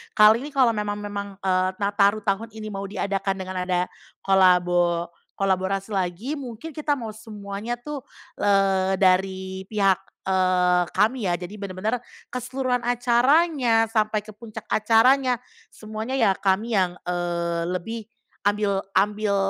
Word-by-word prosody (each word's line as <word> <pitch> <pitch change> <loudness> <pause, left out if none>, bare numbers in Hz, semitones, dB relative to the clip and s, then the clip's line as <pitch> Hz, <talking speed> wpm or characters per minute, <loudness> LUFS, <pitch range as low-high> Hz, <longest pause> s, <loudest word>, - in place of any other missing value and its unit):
Kali 215 0 +7
ini 280 - -6
kalau 255 -3 +5
memang 210 -2 -2
memang, 205 -1 -5 0.2
eee, 185 -1 +2
Nataru 200 +1 +2
tahun 200 +3 -1
ini 215 -1 -6
mau 195 0 -5
diadakan 195 -1 -2
dengan 185 -1 -4
ada 180 0 0 0.3
kolabo 175 -2 +3 0.2
kolaborasi 195 +1 0
lagi 195 - -2
mungkin 255 +4 -7
kita 300 0 -1
mau 225 -4 -6
semuanya 215 0 -6
tuh, 285 +4 -6 0.4
eee, 195 -1 +2
dari 190 0 +1
pihak, 195 -3 +2 0.2
eee, 180 -1 +3
kami 215 +2 +2
ya. 175 - +2
Jadi 185 +4 -8
bener-bener 200 +5 -2 0.3
keseluruhan 250 0 -1
acaranya 245 -1 +3
sampai 215 -1 +1
ke 215 - -11
puncak 215 +1 -10
acaranya, 250 +4 +4 0.3
semuanya 220 +4 -6
ya 225 -7 +4
kami 200 +3 +1
yang, 180 -1 0
eee, 170 -1 -2
lebih 225 +6 -4 0.5
ambil 205 -1 +1 0.2
ambil 205 +1 +2
205 Hz, 130 wpm, -24 LUFS, 190-225 Hz, 0.5 s, Kali